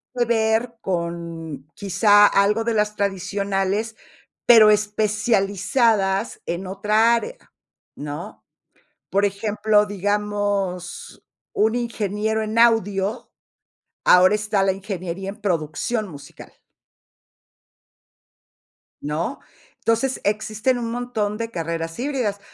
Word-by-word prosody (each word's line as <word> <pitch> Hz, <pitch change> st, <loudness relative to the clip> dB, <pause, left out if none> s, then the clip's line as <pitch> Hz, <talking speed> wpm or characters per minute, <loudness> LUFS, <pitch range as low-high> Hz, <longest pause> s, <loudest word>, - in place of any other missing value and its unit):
que 240 Hz, -, +2 dB
ver 230 Hz, 0 st, 0 dB
con 170 Hz, -, -5 dB
quizá 205 Hz, +1 st, +4 dB
algo 205 Hz, +3 st, +2 dB
de 230 Hz, 0 st, -1 dB
las 210 Hz, 0 st, 0 dB
tradicionales, 200 Hz, +2 st, -2 dB, 0.5 s
pero 225 Hz, -3 st, +8 dB
especializadas 210 Hz, 0 st, +1 dB
en 175 Hz, +2 st, -4 dB
otra 215 Hz, +4 st, +2 dB
área, 485 Hz, -, -4 dB, 0.6 s
¿no? 150 Hz, +3 st, -7 dB, 0.7 s
Por 200 Hz, +1 st, +2 dB
ejemplo, 210 Hz, +1 st, +1 dB
digamos, 205 Hz, -2 st, -3 dB, 0.3 s
un 220 Hz, +2 st, +1 dB
ingeniero 220 Hz, -2 st, -2 dB
en 215 Hz, +1 st, -3 dB
audio, 215 Hz, -2 st, +2 dB, 0.7 s
ahora 185 Hz, +3 st, +6 dB
está 210 Hz, -2 st, 0 dB
la 195 Hz, -, +3 dB
ingeniería 190 Hz, -1 st, -5 dB
en 210 Hz, +2 st, -13 dB
producción 185 Hz, +5 st, -2 dB
musical. 145 Hz, -6 st, -12 dB, 2.5 s
¿No? 155 Hz, -, -3 dB, 0.4 s
Entonces, 230 Hz, +4 st, 0 dB
existen 215 Hz, +4 st, 0 dB
un 230 Hz, -1 st, -3 dB
montón 225 Hz, -4 st, -2 dB
de 230 Hz, 0 st, -4 dB
carreras 165 Hz, -1 st, -4 dB
híbridas. 245 Hz, -7 st, -2 dB
205 Hz, 95 wpm, -22 LUFS, 190-220 Hz, 2.5 s, pero